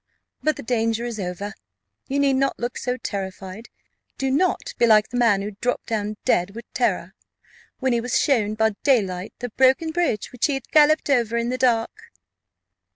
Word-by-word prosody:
But 310 0 +1
the - - -8
danger 230 -1 0
is 235 -3 -5
over; 195 +3 -4 0.5
you 280 +1 -1
need 280 -1 +3
not 270 +1 +1
look 240 +1 -4
so 250 -1 -2
terrified: 195 0 -6 0.5
do 270 -1 -1
not 355 +7 0
be 235 - +5
like 215 -1 +5
the 245 - -4
man 215 -5 +3
who 210 - -4
dropped 245 +1 -1
down 215 -2 -3
dead 180 +4 +1
with 235 +1 -8
terror, - - 0 0.6
when 260 -2 0
he 235 - +1
was 245 +1 0
shown 215 -7 +1
by 220 0 +2
daylight 195 -9 +1
the 245 - -5
broken 265 +7 +3
bridge 325 -11 -1
which 250 - 0
he 285 - 0
had 270 - -6
galloped 305 -1 +4
over 235 -3 +2
in 235 0 -1
the 255 - -1
dark." 230 -3 0
235 Hz, 185 wpm, -23 LUFS, 215-265 Hz, 0.6 s, be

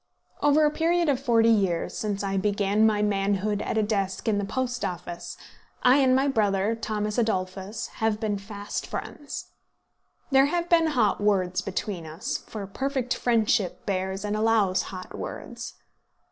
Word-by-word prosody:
Over 290 +1 +5
a 300 - +3
period 335 +1 +2
of 270 -3 +2
forty 230 -4 +4
years, 190 -6 +1
since 205 -2 -2
I 195 0 -1
began 205 +2 +2
my 210 -1 +2
manhood 205 0 0
at - - -2
a 215 - +3
desk 195 -2 -1
in 210 -2 +2
the 200 - -1
Post 250 +3 -2
Office, 175 -1 -5 0.5
I 250 +2 +6
and 260 -2 +4
my 270 +2 +3
brother, 210 -4 +1
Thomas 215 -1 -2
Adolphus, 195 0 -2 0.2
have 220 -1 +1
been 210 -3 -1
fast 205 0 -5
friends. 290 - -6 0.8
There 270 +1 +6
have 345 +3 -1
been 330 -1 +5
hot 210 -3 +2
words 185 -3 +2
between 185 -2 -4
us, 185 - -3
for 210 -3 -7
perfect 260 +4 -2
friendship 220 -5 +1
bears 190 0 -2
and 210 0 -1
allows 215 -4 +3
hot 185 -1 -8
words. - - -7
210 Hz, 160 wpm, -26 LUFS, 195-245 Hz, 0.8 s, I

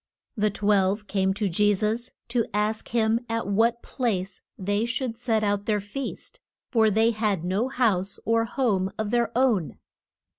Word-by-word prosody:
The 215 -2 +2
twelve 205 0 +1
came 190 -1 +1
to 210 0 0
Je 205 +3 +3
sus 220 +5 -1 0.2
to 235 -1 +1
ask 210 +1 0
him 225 -1 +2
at 230 0 -1
what 230 +4 +1
place 195 -7 -2 0.2
they 205 +3 0
should 235 0 -2
set 225 -2 0
out 205 -1 0
their 210 -2 +2
feast. 205 +7 -6 0.3
For 225 -3 +4
they 220 +3 +3
had 210 -6 -1
no 195 +7 0
house 210 -8 0
or 230 0 +2
home 210 -7 0
of 215 -1 -2
their 235 -2 +1
own. 230 - +1
215 Hz, 160 wpm, -26 LUFS, 200-230 Hz, 0.3 s, For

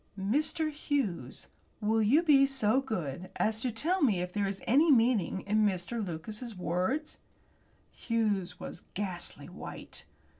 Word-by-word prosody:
"Mr. 305 +9 0
Hughes, 240 - -2 0.3
will 220 +1 +2
you 265 +11 +4
be 275 -4 +6
so 260 -2 +2
good 185 - -4
as 220 +1 0
to 255 - 0
tell 320 - 0
me 220 - +3
if 180 0 -4
there 205 -1 0
is 195 0 -4
any 295 +7 +5
meaning 230 -7 +3
in 215 +2 +1
Mr. 205 +3 0
Lucas's 210 +6 -6
words?" 185 - -2 0.7
Hughes 210 -6 -1
was - - -8
ghastly 185 -3 -3
white. - - -9
220 Hz, 140 wpm, -30 LUFS, 190-270 Hz, 0.7 s, be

